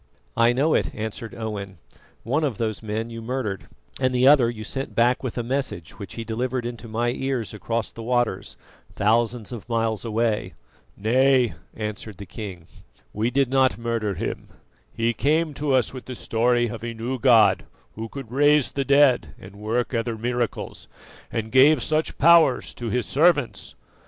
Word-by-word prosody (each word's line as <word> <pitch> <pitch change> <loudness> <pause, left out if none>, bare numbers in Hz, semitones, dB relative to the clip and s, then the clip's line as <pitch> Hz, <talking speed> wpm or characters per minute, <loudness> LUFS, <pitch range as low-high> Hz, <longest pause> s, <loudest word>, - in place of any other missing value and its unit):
"I 115 +1 +4
know 140 +6 +2
it," - - 0
answered 110 +1 -5
Owen; 100 -4 -5 0.5
"one 145 +7 0
of 135 -9 -1
those 110 -3 -2
men 110 +1 -4
you 115 0 -7
murdered, 115 -5 -3 0.3
and 130 -1 +1
the 125 +1 +4
other 135 -5 +6
you 110 -2 -6
sent 135 +5 -4
back 120 +2 +3
with 130 -2 -5
a 120 - -1
message 120 - -3
which 100 - -8
he 115 - -4
delivered 120 +2 -2
into 120 -1 -6
my 120 +2 0
ears 130 -4 -3
across 115 +2 -3
the 115 - -9
waters, 120 0 -1 0.4
thousands 115 +1 +1
of 120 -1 -8
miles 115 -2 0
away." 115 -1 -1 0.4
"Nay," 125 +3 +3 0.2
answered 105 -2 -5
the 100 - -8
king, 95 -6 -8 0.5
"we 110 +3 0
did 130 0 +1
not 130 -1 +3
murder 115 -4 -2
him; - - -4 0.4
he 115 - 0
came 155 +4 +1
to 145 0 -2
us 130 -2 +2
with 130 - -8
the 130 - -7
story 120 +1 +1
of 115 0 -7
a 115 -1 -4
new 125 +3 -3
God 110 -6 +5 0.3
who 115 +1 -6
could 135 -3 -8
raise 145 +1 +4
the 140 - -1
dead 140 -2 +3
and 95 +2 -13
work 115 +5 -2
other 115 -1 -1
miracles, 120 +1 -3 0.4
and 110 -1 -3
gave 135 0 +6
such 155 +1 0
powers 160 -4 +5
to 120 -1 -5
His 120 +1 0
servants. 145 -2 +1
120 Hz, 170 wpm, -24 LUFS, 110-130 Hz, 0.5 s, other